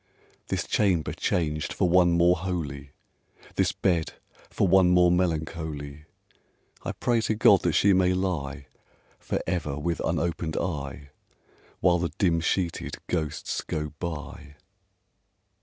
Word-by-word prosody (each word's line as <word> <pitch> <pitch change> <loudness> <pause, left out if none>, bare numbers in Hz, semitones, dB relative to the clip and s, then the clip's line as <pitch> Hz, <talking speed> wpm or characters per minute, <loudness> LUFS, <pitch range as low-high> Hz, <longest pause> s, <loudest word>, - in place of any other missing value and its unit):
This - - -2
chamber 95 -7 +1
changed 75 -3 -1
for 95 - +1
one 90 0 +4
more 85 +1 +4
holy, 80 -6 -4 0.6
This - - +1
bed 85 -5 0 0.4
for - - +1
one 95 0 +5
more 90 -1 +5
melancholy, 80 -4 -2 0.8
I - - -4
pray 120 -2 +1
to 110 - 0
God 105 -2 +5
that 85 - 0
she 100 +5 +4
may 90 0 +3
lie 75 -7 -3 0.5
For - - -2
ever 75 -6 -2
with 85 +3 -2
unopened 85 -1 -1
eye, 70 -5 -4 0.7
While 90 -1 +4
the 85 0 -1
dim 85 -4 +2
sheeted 85 +1 -2
ghosts 80 -4 -2
go 75 -1 -4
by! 75 -3 -6
85 Hz, 125 wpm, -26 LUFS, 75-90 Hz, 0.8 s, one